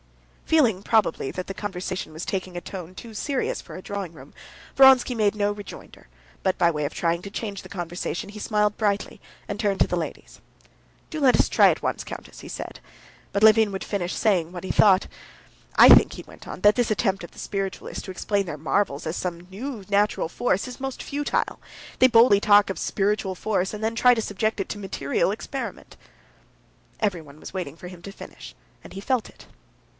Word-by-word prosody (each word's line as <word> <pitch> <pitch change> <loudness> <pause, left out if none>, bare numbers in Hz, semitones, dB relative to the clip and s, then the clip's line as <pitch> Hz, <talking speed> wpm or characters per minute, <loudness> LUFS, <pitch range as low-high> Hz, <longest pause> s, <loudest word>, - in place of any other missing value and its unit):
Feeling 235 -12 +3
probably 210 -12 +1
that 185 - -6
the 195 - -4
conversation 185 -4 -5
was 160 +2 -6
taking 185 -2 -4
a - - -4
tone 185 -2 -8
too 225 +3 -10
serious 270 +5 -2
for - - -11
a 185 - -7
drawing 200 -3 -5
room, - - -14 0.4
Vronsky 265 -2 +6
made 210 -3 +2
no 205 0 +1
rejoinder, 205 - -11 0.3
but 190 -1 +1
by 170 -1 +4
way 150 -3 -2
of 145 - -3
trying 170 0 0
to 200 - -8
change 200 -1 -5
the 185 - -13
conversation, 175 +2 -4
he 210 +1 -9
smiled 210 -1 +1
brightly, 205 -2 -1 0.3
and - - -5
turned 200 -3 0
to - - +4
the - - -1
ladies. 170 -2 -6 0.7
"Do 315 -2 -5
let 265 -3 +5
us - - +4
try - - +5
at - - -1
once, - - -1
countess," - - -9
he - - -10
said; - - -7 0.5
but 200 - 0
Levin 220 -1 +6
would 190 - -4
finish 180 -4 -2
saying 180 -6 +1
what 180 0 -7
he - - -1
thought. 195 -3 +5 0.7
"I - - +10
think," - - +8
he - - -8
went - - -15
on, - - -7
"that 205 0 +6
this 245 -3 +1
attempt 195 -3 0
of 170 - -9
the - - -14
spiritualists 195 -2 -4
to 190 - -7
explain 200 +2 -1
their 150 - -5
marvels 155 -1 0
as 160 - -2
some 180 -2 -2
sort 170 - -14
of 180 - -21
new 225 0 -6
natural 205 -3 +1
force 200 +3 -1
is 250 +1 -9
most 270 -1 -4
futile. 290 +1 -2 0.4
They 255 - +8
boldly 225 -4 +6
talk 205 -1 +5
of 195 - -4
spiritual 200 -1 0
force, 195 -1 -1
and 210 - -6
then 225 +1 0
try 250 +1 +5
to 225 - -1
subject 215 +1 -2
it 195 - -2
to 210 - -5
material 185 -3 -1
experiment." 260 +5 -6 1.0
Everyone 165 -8 -3
was - - -10
waiting 170 -5 -5
for 180 - -9
him 180 -1 -11
to 200 - -8
finish, - - -11 0.3
and - - -12
he 190 - -6
felt 240 +3 -1
it. - - -17
200 Hz, 210 wpm, -24 LUFS, 180-215 Hz, 1.0 s, I